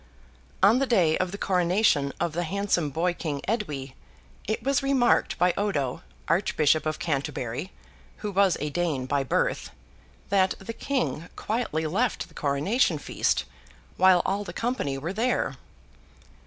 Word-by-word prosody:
On 215 +6 +6
the 275 - +1
day 175 -10 +3
of 185 -1 0
the 200 - -5
coronation 180 -6 +2
of 170 -2 -1
the 175 - -1
handsome 180 -3 0
boy 170 +5 0
king 150 -5 -4
Edwy, 150 - -2 0.5
it 220 +2 -2
was 275 +1 +2
remarked 270 -3 +2
by 180 0 +3
Odo, 145 -11 -1 0.3
Archbishop 155 -3 +2
of 155 - -1
Canterbury 140 0 -3 0.5
(who 205 - -1
was 195 -1 +3
a 150 0 -3
Dane 155 -6 -1
by 140 +1 0
birth), 130 - 0 0.6
that 190 -1 +3
the 210 +4 -7
King 245 - -2
quietly 210 -8 -2
left 210 +9 0
the - - -19
coronation 155 - +1
feast, 145 - 0 0.5
while 185 -1 +5
all 200 +2 0
the - - -8
company 230 - -2
were 165 +7 -4
there. 235 +4 0
180 Hz, 145 wpm, -26 LUFS, 150-210 Hz, 0.6 s, On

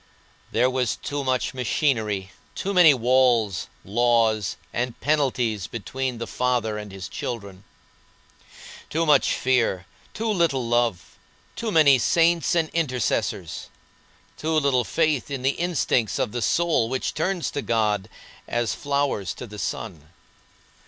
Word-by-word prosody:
There 120 +2 +3
was 130 -2 0
too 145 0 -4
much 130 -1 0
machinery, 110 - 0 0.2
too 200 - -2
many 175 -4 +8
walls, 120 -6 +2 0.2
laws, 110 -2 +2 0.2
and 125 0 -2
penalties 125 - 0
between 125 +3 -4
the 115 - -4
Father 120 -4 -1
and 105 -1 -7
His 95 -2 -7
children. 100 -5 -6 1.3
Too 165 +2 0
much 150 -3 +4
fear, 115 -8 +1 0.3
too 225 - -2
little 165 - +1
love; 115 -7 -1 0.4
too 230 -2 -3
many 145 -7 +6
saints 170 +6 +3
and 165 -2 +1
intercessors; 130 -8 -2 0.7
too 160 +1 -1
little 140 -5 +2
faith 155 -3 0
in 135 -3 -4
the 135 - +3
instincts 140 - 0
of - - -1
the 120 - -3
soul 145 - +2
which 130 +1 -2
turns 180 +2 -1
to 145 - -3
God 105 -4 0 0.4
as 120 -1 -1
flowers 140 - -1
to - - -7
the 105 -2 -10
sun. 80 -11 -5
125 Hz, 130 wpm, -24 LUFS, 110-145 Hz, 1.3 s, many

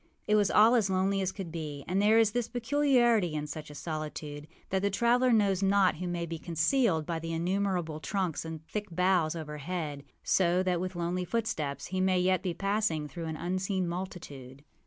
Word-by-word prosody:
It 210 - +1
was 210 -2 +4
all 220 +3 +6
as 220 -5 +3
lonely 190 +1 +1
as 190 -1 -1
could 190 -5 -7
be; 150 -4 -6
and 190 +3 +1
there 215 +2 +5
is 225 -2 +4
this 240 +1 -1
peculiarity 240 - +2
in 150 0 -2
such 150 +1 -7
a 150 - -10
solitude, 150 -1 -5 0.2
that 190 0 +1
the 200 - +1
traveller 240 +5 +3
knows 200 -4 +3
not 195 -2 +3
who 180 +2 -4
may 175 -1 -2
be 165 -1 -6
concealed 165 - +1
by 165 0 -2
the 165 0 -5
innumerable 175 -2 -1
trunks 180 +1 -2
and 160 -1 -6
the - - -29
thick 210 +5 -5
boughs 180 -2 +2
overhead; 150 -1 -5 0.2
so 180 0 +2
that 180 -2 0
with 185 0 -4
lonely 175 +1 -1
footsteps 180 -8 -2
he 185 0 -2
may 185 -1 +3
yet 185 0 +2
be 180 -3 -3
passing 195 -6 0
through 165 +2 -7
an 160 -1 -4
unseen 185 +2 -1
multitude. 145 -7 -7
180 Hz, 200 wpm, -30 LUFS, 160-200 Hz, 0.2 s, all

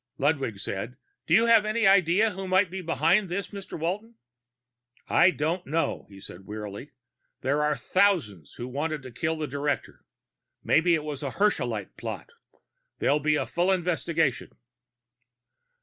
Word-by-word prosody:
Ludwig - - 0
said, - - -5 0.3
"Do - - +4
you 225 - +5
have 230 -2 +6
any 215 +1 0
idea 195 +3 +4
who 190 0 -6
might 185 -1 +3
be 190 0 -4
behind 170 +3 +2
this, 180 +2 -3
Mr. 200 -2 -8
Walton?" 200 +8 -3 0.9
"I 185 - +5
don't 170 +2 -2
know," 160 +4 -1
he 100 -1 -13
said 95 0 -11
wearily. 105 +5 -7 0.5
"There 140 +3 +1
are 150 0 +1
thousands 145 - +1
who'd 120 +1 -6
have - - -12
wanted 150 0 -2
to 130 - -9
kill 160 +7 -2
the 155 -1 -3
director. 145 +1 -3 0.6
Maybe 170 +2 +4
it 155 - -3
was 150 -2 -5
a 140 - -2
Herschelite 210 +1 -1
plot. - - -6 0.7
There'll 145 - +2
be 150 +1 +2
a - - 0
full 175 +2 +1
investigation." 165 -5 0
165 Hz, 155 wpm, -27 LUFS, 145-190 Hz, 0.9 s, have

